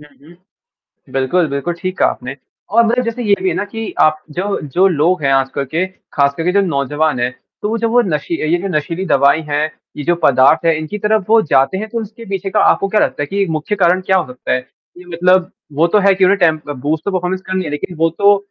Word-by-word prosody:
हुँ, 150 - -14 0.2
हुँ। 170 - -16 0.8
बिल्कुल, 135 +7 +1
बिल्कुल, 140 +5 -2
ठीक 185 +2 -5
कहा - - +4
आपने। 135 +3 -6 0.4
और 235 +2 +5
मतलब 245 +2 +1
जैसे 230 +1 -3
ये 205 -3 +3
भी 190 - +1
है 175 - -1
ना 205 - -1
कि 220 +1 -6
आप 155 0 +3
जो 190 +6 -2
जो 185 +2 +4
लोग 170 0 +1
हैं 135 -1 +2
आजकल 135 +1 0
के, 165 +7 -1 0.3
ख़ासकर 140 +2 +1
के 180 - +1
जो 200 - +3
नौजवान 145 -2 -1
हैं, 125 +1 0 0.3
तो 215 +2 -1
जब 230 0 0
वो 245 +1 +4
नशी 170 -5 -2 0.2
ये 175 - +3
जो 195 - -2
नशीली 165 +5 -3
दवाई 140 -1 +3
है, 145 +1 +1 0.3
ये 145 - -5
जो 175 - +2
पदार्थ 135 +5 +4
है, 165 -1 +3
इनकी 155 +7 -5
तरफ़ 210 0 +1
वो 225 +1 +5
जाते 135 +2 +2
हैं, 215 +2 -5
तो 230 +1 -3
उसके 220 +2 -9
पीछे 195 0 -3
का - - +1
आपको 195 - +3
क्या 210 +2 +2
लगता - - 0
है - - -2
कि 200 +6 -1
एक 195 - -1
मुख्य 160 +6 -2
कारण 180 -1 +3
क्या 190 - +3
हो 185 - 0
सकता 125 - -4
है? - - +2 0.4
ये 180 - -12
मतलब 180 +1 +2 0.2
वो 155 +4 +2
तो - - +7
है 195 - +5
कि 190 0 +2
उन्हें 195 +2 +3
टेम्प 155 -4 +1
बूस्ट 145 +5 -3
ऑफ़ - - -1
परफ़ॉर्मेंस 185 +1 -1
करनी 185 0 -2
है, 155 - -4
लेक़िन 145 +4 -5
वो 165 +1 +2
तो 205 0 +5
175 Hz, 250 wpm, -16 LUFS, 150-195 Hz, 0.8 s, तो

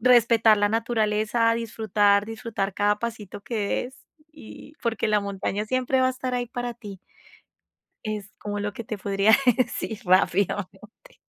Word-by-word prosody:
respetar 230 -3 +5
la 205 0 +3
naturaleza, 225 0 +1
disfrutar, 210 -3 +1
disfrutar 220 -3 -4
cada 205 0 +1
pasito 220 -4 -6
que 230 - -5
des 260 +2 -4 0.3
y 300 0 -13
porque 225 -2 -1
la 210 -1 +3
montaña 200 +1 -3
siempre 255 +2 +1
va 255 - +4
a - - +1
estar 255 0 -4
ahí 245 -1 -1
para 245 0 -4
ti. 205 -4 -10 1.1
Es 210 -2 -4
como 205 0 -4
lo 205 0 -3
que 230 - -7
te 215 -1 -5
podría 200 +2 +3 0.2
decir 240 -4 -2
rápidamente. 195 - 0
220 Hz, 150 wpm, -25 LUFS, 205-240 Hz, 1.1 s, respetar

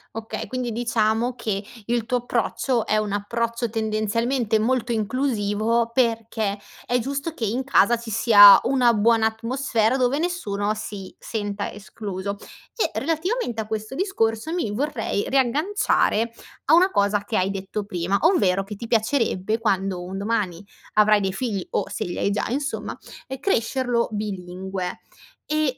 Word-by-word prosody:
Okay, 225 0 -5
quindi 250 -2 -3
diciamo 230 +1 0
che 215 -4 -3 0.2
il 235 -1 0
tuo 250 - +1
approccio, 245 0 -1
è 215 - +2
un 210 -1 -1
approccio 230 +3 -2
tendenzialmente 220 +2 0
molto 245 +1 0
inclusivo, 230 -1 0
perché 225 -4 0 0.3
è 245 - +1
giusto 280 +6 -3
che 230 - -3
in 240 +6 -1
casa 240 -3 +4
ci 230 -1 -9
sia 205 -2 +8
una 250 -3 +3
buona 225 +1 +3
atmosfera, 230 +1 0
dove 255 +2 +2
nessuno 215 - -1
si 205 -3 -7
senta 205 -2 -4
escluso. 200 -1 -6 0.4
E 450 - +1
relativamente 325 - -1
a 215 - -7
questo 220 +2 -4
discorso, 315 - -1
mi 290 -13 -1
vorrei 230 -4 -2
riagganciare 270 - +1 0.3
a 300 - +4
una 360 +3 +6
cosa 200 - +1
che 215 +1 -2
hai 185 +1 +1
detto 195 +1 -4
prima, 185 0 -1
ovvero 195 - +3
che 205 +2 -8
ti 230 +3 -7
piacerebbe, 225 -3 +1
quando 195 -4 0
un 185 +2 -6
domani 200 -3 -2 0.3
avrai 210 0 +5
dei 190 -1 -1
figli, 205 -4 -3
o - - -1
se - - -3
li 175 - -5
hai 200 - +1
già 205 - -1
insomma, 280 +3 -3 0.3
ehm, 265 0 -6
crescerlo 245 - 0
bilingue; 190 -2 -4 0.5
e 305 -4 0
225 Hz, 150 wpm, -23 LUFS, 205-250 Hz, 0.5 s, sia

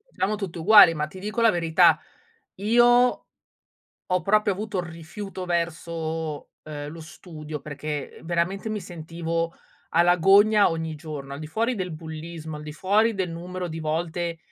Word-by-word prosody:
Siamo 200 +3 0
tutti 195 -5 -6
uguali, 205 0 +8
ma 150 -1 -2
ti 185 +5 -11
dico 210 +4 -3
la 230 -1 +6
verità: 165 -2 +4 0.6
io 240 +4 +4 0.8
ho 180 -1 +1
proprio 210 +3 +3
avuto 200 0 -3
rifiuto 175 +3 -8
verso, 165 -2 -3 0.2
uhm, 145 -1 -6
lo 165 +2 -9
studio, 155 -2 -9
perché 145 0 -6
veramente 175 +5 -1
mi 215 -1 -3
sentivo 165 -1 -4 0.4
alla 175 +1 +4
gogna 200 +3 +5
ogni 160 -1 -3
giorno. 145 -3 -7
Al - - -7
di 155 - -6
fuori 230 +10 -1
del 185 -5 -4
bullismo, 160 0 -7
al 150 - -8
di 150 0 -7
fuori 210 +7 +2
del 190 -3 -2
numero 180 +2 -5
di 160 0 -6
volte 165 +2 -2
170 Hz, 155 wpm, -25 LUFS, 160-195 Hz, 0.8 s, uguali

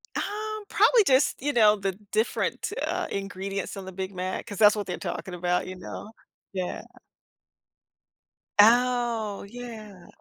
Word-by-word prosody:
Um, 430 0 -3
probably 465 -4 +5
just, 265 -1 +3
you 290 +1 0
know, 215 -3 +6
the 195 -1 -2 0.2
different, 220 - 0
uh, - - -2
ingredients 195 0 -4
on 190 - -7
the 190 - -7
Big 190 +1 -5
Mac, 185 +1 -3
'cause 205 -3 -7
that's 210 0 +7
what 205 - -3
they're 180 - -3
talking 185 - -5
about, 180 +1 0
you 185 - -6
know? 205 +4 -8 0.4
Yeah. 185 -2 -3 1.8
Oh, 235 -2 +4
yeah. 220 -6 -9
210 Hz, 140 wpm, -27 LUFS, 190-245 Hz, 1.8 s, that's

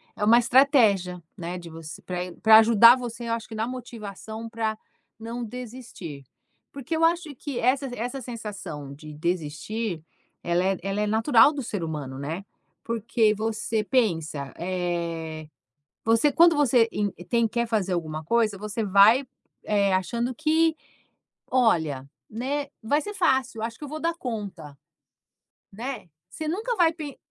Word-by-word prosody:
É 210 - -4
uma 230 +3 +6
estratégia, 230 - +4 0.2
né, 175 +1 -5
de 170 -1 -9
você 160 -1 -9
pra 180 -1 -5 0.2
pra 220 -1 +9
ajudar 230 +2 +8
você 240 -1 -6
eu 230 - 0
acho 230 0 -4
que 220 - -7
na 220 +2 -1
motivação 225 -3 -7
para 220 -1 -2 0.4
não 235 +2 -5
desistir, 230 - -8 0.5
porque 280 +4 -4
eu 325 - 0
acho 330 -2 +2
que 275 -1 -5
essa 265 +3 +2
essa 250 +4 -4
sensação 200 - -7
de 150 +1 -11
desistir, 170 +5 -3 0.4
ela 175 +1 +1
é 190 0 +1
ela 195 +1 -1
é 210 - 0
natural 225 +4 +5
do 280 - -4
ser 205 -6 -4
humano, 145 -5 -5
né. 160 +8 -5 0.4
Porque 225 -1 +1
você 220 0 -2
pensa, 165 - 0
eh, 170 -3 -3 0.6
você, 230 +6 +4
quando 335 -1 +6
você 245 -5 +4
en 205 -2 -1 0.2
tem, 235 -2 +3
quer 235 +1 -1
fazer 200 -5 0
alguma 155 -2 -3
coisa, 220 +1 +1
você 210 +2 -3
vai, 205 +7 +6 0.4
eh, 200 -2 +2
achando 235 +7 -1
que: 320 +3 +2 0.8
"Olha, 160 - +2 0.2
né, 275 +6 -3 0.2
vai 285 +7 +2
ser 415 - -6
fácil 265 - +1
acho 230 0 -4
que - - -11
eu - - -8
vou 310 +1 -5
dar 335 0 0
conta", 200 - -6 0.9
né. 240 0 -6 0.2
Você 310 +8 -6
nunca 440 +9 -1
vai 340 -5 +4
pen 300 -4 -7
220 Hz, 155 wpm, -25 LUFS, 180-250 Hz, 0.9 s, pra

